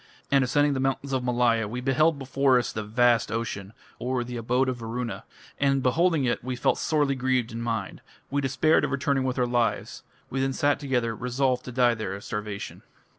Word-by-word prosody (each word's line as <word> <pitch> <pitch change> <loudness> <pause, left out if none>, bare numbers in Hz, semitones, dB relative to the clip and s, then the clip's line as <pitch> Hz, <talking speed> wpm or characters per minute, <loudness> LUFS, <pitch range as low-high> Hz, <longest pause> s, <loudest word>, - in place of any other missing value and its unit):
And 140 -1 +5
ascending 145 +3 +2
the 135 - -2
mountains 135 +1 -1
of 130 -1 0
Malaya, 120 -3 +2
we 120 +4 -4
beheld 145 +5 +2
before 135 -1 +2
us 120 - -1
the 110 - -3
vast 115 +2 +2
ocean 105 -4 -4 0.3
(or, 125 0 -1
"the 120 0 -7
abode 125 +3 +1
of 130 -1 -1
Varuna"). 115 +1 -5 0.3
And 135 -1 +2
beholding 160 +2 +2
it, 120 - -1
we 130 0 -3
felt 125 - +1
sorely 145 -3 +1
grieved 130 -2 0
in 115 +1 -5
mind.... 115 -5 -3 0.3
We 140 +1 +1
despaired 135 +4 +2
of - - 0
returning 140 -1 0
with 130 0 -1
our 125 - +2
lives.... 120 -1 -1 0.3
We 135 - -1
then 135 0 0
sat 145 +2 +1
together, 125 -5 -1
resolved 125 +2 0
to 125 - -6
die 120 -1 +3
there 110 -4 -4
of 100 - -9
starvation." 105 -1 -5
125 Hz, 200 wpm, -26 LUFS, 115-135 Hz, 0.3 s, And